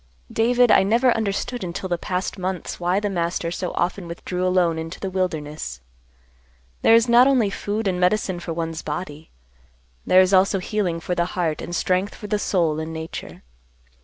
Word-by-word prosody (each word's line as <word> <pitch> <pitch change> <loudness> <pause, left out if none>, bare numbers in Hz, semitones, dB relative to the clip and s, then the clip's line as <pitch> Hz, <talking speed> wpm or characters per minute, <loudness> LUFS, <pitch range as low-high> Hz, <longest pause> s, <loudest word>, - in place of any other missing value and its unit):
"David, 245 +1 +3
I - - +7
never 230 +5 +3
understood 225 +2 -2
until 180 +1 -4
the 175 -2 -1
past 185 +3 -3
months 185 -1 -4
why 180 +2 +1
the 205 - -2
Master 170 -2 -2
so 180 0 -3
often 175 +1 -1
withdrew 180 +2 -4
alone 175 -3 +2
into 165 +2 -6
the 195 - -4
wilderness. 150 - -3 1.0
There 225 - +6
is 230 +1 +4
not 240 +2 +6
only 245 -7 +3
food 210 +2 -3
and 180 -2 0
medicine 185 0 +1
for 170 - -6
one's 165 -1 -3
body; 150 0 -6 0.7
there 185 +1 +6
is 185 +1 +2
also 195 +1 +4
healing 180 -3 -2
for 180 - -2
the 175 -1 +1
heart 160 -4 0
and 175 - -5
strength 185 +3 0
for 210 - -10
the 210 0 -1
soul 165 -7 +1
in 160 +1 -4
nature. 160 0 -7
185 Hz, 180 wpm, -23 LUFS, 170-205 Hz, 1.0 s, I